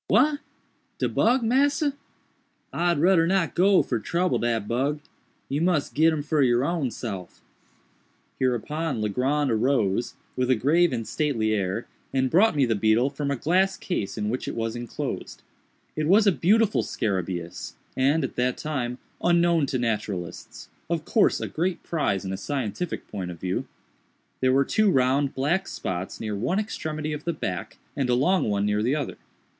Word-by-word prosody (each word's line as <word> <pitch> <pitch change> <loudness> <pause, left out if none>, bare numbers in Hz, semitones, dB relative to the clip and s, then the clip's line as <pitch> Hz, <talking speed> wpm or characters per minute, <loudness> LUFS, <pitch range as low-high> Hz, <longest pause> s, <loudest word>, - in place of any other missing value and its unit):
_" - - -66
"What! 285 +8 +3 0.6
de - - 0
bug, 245 +2 +2
massa? 285 +5 +2 0.8
I'd 175 -1 +1
rudder 165 +1 +4
not 185 -2 +1
go 190 +1 +4
fer - - -1
trubble 180 +1 0
dat 115 -3 0
bug—you 140 +3 -4
mus' 170 -4 +1
git 160 +3 +4
him 155 -2 -2
for 150 0 +1
your 125 0 +3
own 160 -5 0
self." 100 -7 -6 1.0
Hereupon 135 +3 -1
Legrand 130 +7 0
arose, 115 -2 +1 0.2
with 125 0 0
a 130 - +5
grave 160 +9 +3
and 115 -3 -3
stately 115 -8 0
air, 100 +2 -1 0.3
and 130 -1 +1
brought 195 +3 +4
me 140 -2 +3
the 115 - +1
beetle 110 +5 +2
from 145 0 -3
a 140 - +1
glass 185 +8 +1
case 110 - -3
in 105 -1 -1
which 125 - -3
it - - -3
was 115 0 -2
enclosed. 120 -1 -5 0.5
It 155 0 -1
was 205 +5 +5
a 200 - +6
beautiful 210 +5 +3
scarabæus, 90 -4 -3 0.2
and, 140 +4 +2
at 130 - -4
that 125 0 +1
time, 125 -5 -3 0.3
unknown 170 -3 +3
to 130 - -1
naturalists—of 110 - -4
course 220 - +3
a - - -3
great 175 +3 -2
prize 100 - -1
in 95 - -3
a - - -3
scientific 135 - -3
point 95 -3 -5
of 85 -2 -8
view. 90 +1 -2 0.7
There 130 0 +3
were 135 +1 +3
two 215 +6 +3
round, 135 -2 +2
black 170 +9 0
spots 95 0 -4
near 105 -2 -3
one 125 - -1
extremity 155 -7 -3
of 150 0 -6
the 170 - -1
back, 90 - -5 0.2
and 135 -3 -1
a 120 - +4
long 180 - +2
one 100 -1 +1
near 105 0 +1
the 125 +6 +1
other. 150 - -3
140 Hz, 170 wpm, -25 LUFS, 115-170 Hz, 1.0 s, a